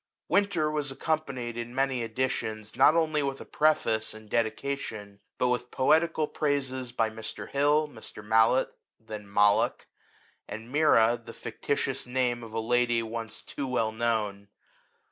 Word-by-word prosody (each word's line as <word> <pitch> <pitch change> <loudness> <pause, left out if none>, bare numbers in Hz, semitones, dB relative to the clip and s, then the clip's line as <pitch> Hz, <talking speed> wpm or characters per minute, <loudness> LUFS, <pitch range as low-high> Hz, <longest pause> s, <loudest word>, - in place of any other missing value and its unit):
Winter*' 190 -7 +2
was 150 -2 -2
accompanied, 135 -5 -2
in 120 +1 -5
many 135 -2 +1
editions, 110 -2 -3
not 155 - +6
only 155 -2 +2
with 135 -1 -2
a - - -9
preface 115 -8 +1
and 110 -1 -14
dedica 120 +5 0
tion, 105 -6 -8 0.2
but 125 - +2
with 125 0 -1
poetical 155 +5 +3
praises 135 -5 -2
by 115 -2 +1
Mr. 110 0 -6
Hill, 145 +2 +3
Mr. 110 -5 -10
Mallet 110 +4 +4 0.3
(then 105 -2 -9
Malloch), 105 0 +3 0.6
and 115 +3 -8
Mira, 120 -6 +4
the - - -10
fictitious - - -2
name 125 -1 0
of 115 -1 -9
a 115 - -2
lady 120 0 +2
once 115 -1 -5
too 140 - -5
well 115 -4 0
known. 110 -3 -1
120 Hz, 145 wpm, -28 LUFS, 110-140 Hz, 0.6 s, not